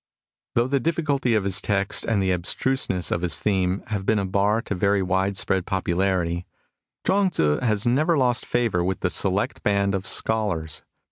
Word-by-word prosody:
Though 120 - +3
the 140 +2 0
diifficulty 140 -6 0
of 105 - -1
his 95 0 +2
text 100 -1 0
and 105 -4 +1
the 95 - +1
abstruseness 90 +1 0
of 85 - 0
his 85 -3 +2
theme 95 -2 0
have 100 -3 -2
been 110 +2 +1
a 100 - 0
bar 100 +4 +1
to - - -4
very 100 +1 +1
wide 95 +1 0
spread 95 -3 -1
popularity, 90 -2 -1 0.6
Chuang 195 0 +3
Tzu 75 - +1
has 110 -3 0
never 150 +7 +2
lost 125 -3 +1
favour 115 -8 0
with 95 +2 -2
the 90 - 0
select 95 +1 0
band 100 -1 +1
of 95 0 -2
scholars. 95 -8 0
100 Hz, 180 wpm, -23 LUFS, 95-115 Hz, 0.6 s, Though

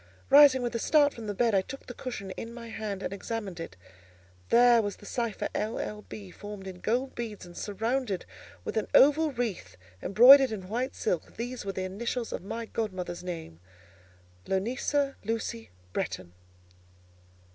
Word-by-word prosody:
Rising 275 -3 +8
with 240 - -2
a 230 - -1
start 290 +3 +4
from 230 -2 -8
the 205 - -2
bed, 235 +1 +2
I 195 - +4
took 270 +8 -9
the 245 - -8
cushion 235 -7 -6
in 230 +5 -6
my 235 -1 -8
hand 210 -3 -4
and 185 - -3
examined 200 -3 -5
it. 130 - -7 0.7
There 240 0 +6
was 205 -2 -3
the - - -15
cipher 235 -1 -2
"L. 215 +2 -2
L. 210 0 -4
B." 200 -4 -8
formed 205 0 -9
in 185 -1 -8
gold 250 +7 -1
beds, 220 -5 -6
and 175 -1 -13
surrounded 225 0 -2 0.4
with - - -4
an 215 - 0
oval 300 +3 +6
wreath 210 - -4 0.2
embroidered 260 +6 +8
in 190 -4 -6
white 245 +4 -2
silk. 180 -6 -2
These 245 0 -5
were 195 - -1
the 185 - -3
initials 230 +5 -3
of - - -4
my 230 +5 -5
godmother's 185 -6 -4
name—Lonisa 95 - -4
Lucy 225 +1 -3 0.2
Bretton. 95 -1 -3
215 Hz, 165 wpm, -29 LUFS, 185-240 Hz, 0.7 s, Rising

